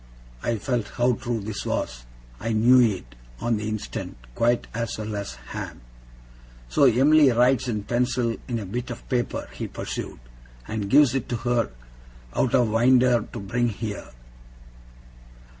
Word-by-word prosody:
I 120 - 0
felt 120 0 -1
how 125 +1 +3
true 120 -2 -3
this 100 0 -5
was. - - -3 0.3
I 115 +1 -2
knew 120 +4 +6
it, 95 - 0 0.3
on 120 -2 0
the 105 +1 -3
instant, 110 - -5 0.2
quite 120 - +2
as 115 -1 -3
well 110 0 -4
as 100 -11 -4
Ham. - - -6 0.9
'So 100 - +4
Em'ly 140 +4 +6
writes 125 +1 +3
in 105 -4 -2
pencil 120 0 0
on 120 - -1
a 110 - -4
bit 120 +7 -4
of 120 - -8
paper,' 120 -3 -1
he - - -4
pursued, - - -5 0.5
'and 105 -2 -3
gives 140 -1 +6
it 135 - -2
to 120 - -1
her 120 -2 +2 0.6
out 125 - +2
o' 125 - +5
winder 120 +1 +4
to 120 - -6
bring 120 +4 0
here. 105 -1 -5
115 Hz, 155 wpm, -25 LUFS, 110-125 Hz, 0.9 s, knew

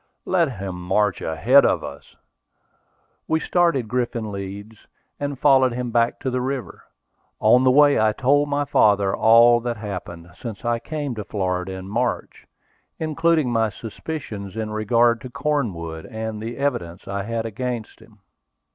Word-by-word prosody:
"Let 170 -7 +1
him 95 -3 -6
march 95 +2 +1
ahead 125 - +4
of - - +1
us." - - -10 1.1
We 160 - +1
started 170 -9 +1
Griffin 120 -2 -2
Leeds, 100 +2 -8 0.3
and 145 -1 -3
followed 130 -2 +4
him 125 0 -3
back 115 0 +1
to 130 - -2
the 125 0 -1
river. 130 0 -5 0.5
On 125 +4 +5
the 130 - +5
way 145 +2 +5
I 110 0 +3
told 145 +6 +2
my 145 0 0
father 100 -6 +3
all 115 +1 +6
that 120 -1 -3
happened 90 -5 -7
since 115 -1 -8
I 120 0 +1
came 145 -1 -4
to 110 -2 -5
Florida 95 -2 -2
in 95 0 -7
March, 100 - -3 0.5
including 160 -3 +1
my 115 -2 +2
suspicions 110 -2 -7
in 110 -1 -3
regard 115 +2 +2
to 130 - -8
Cornwood, 115 - -3
and 110 -1 -5
the 115 +2 -6
evidence 120 -12 -3
I 100 0 -3
had 115 +2 -3
against 115 0 -5
him. 105 -3 -20
115 Hz, 155 wpm, -22 LUFS, 100-130 Hz, 1.1 s, all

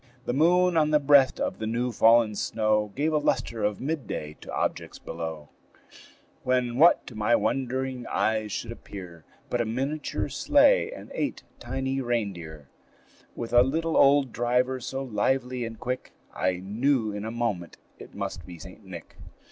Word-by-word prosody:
The - - -1
moon 175 +4 +3
on 155 -1 +3
the 150 -1 +4
breast 140 -2 +5
of - - -2
the 110 - -3
new 120 +2 -1
fallen 115 -1 +5
snow 105 0 0
Gave 155 +3 0
a 150 - +3
lustre 115 -6 -1
of 105 -1 0
midday 130 - -4
to - - -9
objects - - -2
below; 80 -3 -6 0.9
When 125 -1 0
what 170 +3 +6
to - - -10
my 110 +2 +2
wondering 130 -1 -2
eyes 110 -1 0
should 115 - -4
appear, 90 -8 -10 0.3
But 120 - +1
a - - 0
miniature 135 +7 -2
sleigh 290 - +4
and - - -10
eight - - -3 0.2
tiny 135 +2 -2
reindeer, 90 - -3 0.7
With 115 0 -6
a 120 - +8
little 160 +5 0
old 140 -2 +5
driver, 125 +3 0
so 135 +2 -4
lively 125 0 -1
and 115 -1 -8
quick 125 +1 -4 0.2
I 95 0 0
knew 110 +3 0
in 105 0 -5
a 110 - -4
moment 115 -7 -3 0.2
it - - -12
must 100 -4 -5
be 90 -2 -10
St. 95 +6 -12
Nick. 90 -4 -11
120 Hz, 165 wpm, -26 LUFS, 105-135 Hz, 0.9 s, a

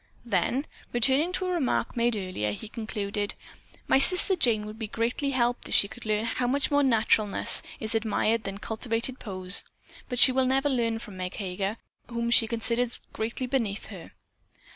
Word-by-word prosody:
Then, 235 - 0 0.3
returning 265 +8 +3
to 370 - -2
a 365 - -2
remark 320 -8 -1
made 235 -1 +1
earlier, 185 - -3
he 215 - -8
concluded: 210 -2 -4 0.5
"My - - +4
sister 365 +6 +6
Jane 230 -10 +1
would 215 +1 -9
be 220 - -4
greatly 235 +6 -2
helped 245 -2 -1
if - - 0
she 200 - +5
could 245 - -13
see 215 0 0
how 245 +2 -1
much 275 +3 0
more 285 0 +3
naturalness 225 -5 +3 0.2
is 220 +1 0
admired 225 0 0
than 195 0 -5
cultivated 230 +4 -4
poses, 185 -3 +1 0.5
but 250 - -3
she 255 - +8
will 260 0 +1
never 270 +2 +1
learn 230 -4 0
from 210 -4 -10
Meg 185 +1 -5
Heger, 195 +2 -4 0.3
whom 235 0 -2
she 230 -1 +6
considers 235 +1 -1
greatly 230 +4 -3
beneath 230 -6 -2
her." - - -10
230 Hz, 175 wpm, -27 LUFS, 210-255 Hz, 0.5 s, she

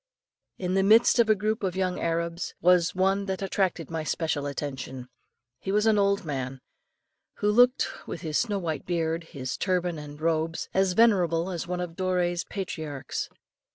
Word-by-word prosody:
In 180 -1 -2
the 195 - +3
midst 220 +5 +5
of 230 -2 +4
a 215 - +6
group 215 +3 -1
of 190 -3 -1
young 185 -1 -1
Arabs, 170 +1 -2
was 180 -1 +4
one 195 +2 +1
that 190 0 -2
attracted 185 -5 -1
my 165 -1 -2
special 155 -2 -1
attention. 130 -3 -5 0.5
He 195 - -3
was 210 +2 +2
an 220 -2 +4
old 200 -1 +2
man 135 -3 -4 0.8
who 210 - +1
looked, 245 +4 +3
with - - -5
his 155 -3 0
snow 210 -4 0
white 160 -6 -3
beard, 165 -1 -1
his 130 -5 -5
turban 180 -4 0
and 145 0 -9
robes, 160 0 -1
as 190 -1 +2
venerable 180 -5 +3
as 175 -2 -4
one 180 0 -2
of 175 -1 -4
Doré's 175 -1 0
patriarchs. 155 -8 -5
180 Hz, 170 wpm, -27 LUFS, 160-195 Hz, 0.8 s, a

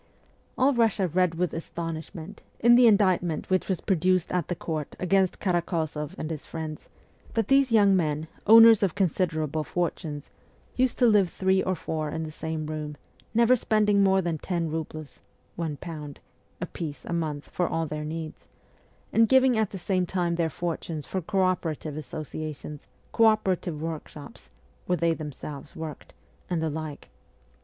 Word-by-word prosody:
All 265 +2 +4
Russia 225 -5 +2
read 180 0 +1
with 175 0 -1
astonishment, 165 +2 -6 0.2
in 235 +1 +6
the 245 0 +7
indict 200 -4 +4
ment 175 +1 -4
which 185 +1 +1
was 190 - -1
produced 185 -2 +1
at 180 -1 0
the 175 - -2
court 155 -3 -4
against 190 0 +2
Karakozoff 165 -5 -1
and 155 - -4
his 155 -2 -5
friends, 155 -2 -7 0.5
that 225 -3 0
these 270 -2 +4
young 205 -3 +5
men, 155 -3 0 0.2
owners 225 0 +9
of 195 -5 +1
considerable 160 -5 0
fortunes, 155 -3 -3 0.4
used 255 0 +1
to 250 - +4
live 205 -5 +4
three 190 +2 +1
or 185 - 0
four 155 -2 -3
in 160 +2 -3
the 155 - -6
same 160 0 -4
room, 150 -1 -5 0.4
never 235 +2 +5
spending 210 -3 +2
more 190 -1 +3
than 165 -2 -2
ten 170 -2 -2
roubles 155 -2 -6 0.4
(one 160 -4 -3
pound) 150 -4 -8 0.4
apiece 150 -4 -6
a - - -4
month 155 -3 -3
for 175 - 0
all 165 0 -1
their 150 0 -4
needs, 160 +1 -6 0.7
and 225 -1 +4
giving 260 -1 +5
at 220 -2 +1
the 195 - -7
same 185 0 0
time 175 -2 0
their 170 -1 0
fortunes 165 -1 -4
for 190 - -3
co 190 +2 0
opera 180 -4 0
tive 150 0 -7
associations, 150 0 -6 0.2
co 230 - +4
operative 190 -7 +1
workshops 155 -2 -7 0.4
(where 180 - +1
they 170 0 +2
themselves 150 -2 -8
worked), 160 -2 -7 0.4
and 175 -2 0
the 160 -1 -1
like. 155 -1 -6
170 Hz, 165 wpm, -27 LUFS, 155-190 Hz, 0.7 s, owners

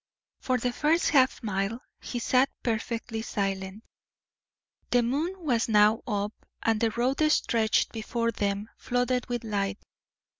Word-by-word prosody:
For 255 -1 0
the 245 0 -1
first 315 +5 +2
half 260 -3 +3
mile 205 +2 -1 0.2
he 245 - -5
sat 255 +3 +3
perfectly 230 0 -2
silent. 195 -1 -3 1.1
The 245 -1 +3
moon 295 +10 -1
was 250 -10 0
now 210 +1 +5
up, 205 -1 -1 0.3
and 225 -1 +1
the 230 - +3
road 250 +6 0
stretched 225 -6 +2
before 230 +1 -1
them, 200 -1 -2
flooded 245 0 0
with 240 -1 -2
light. 200 -3 -1
230 Hz, 135 wpm, -28 LUFS, 210-250 Hz, 1.1 s, now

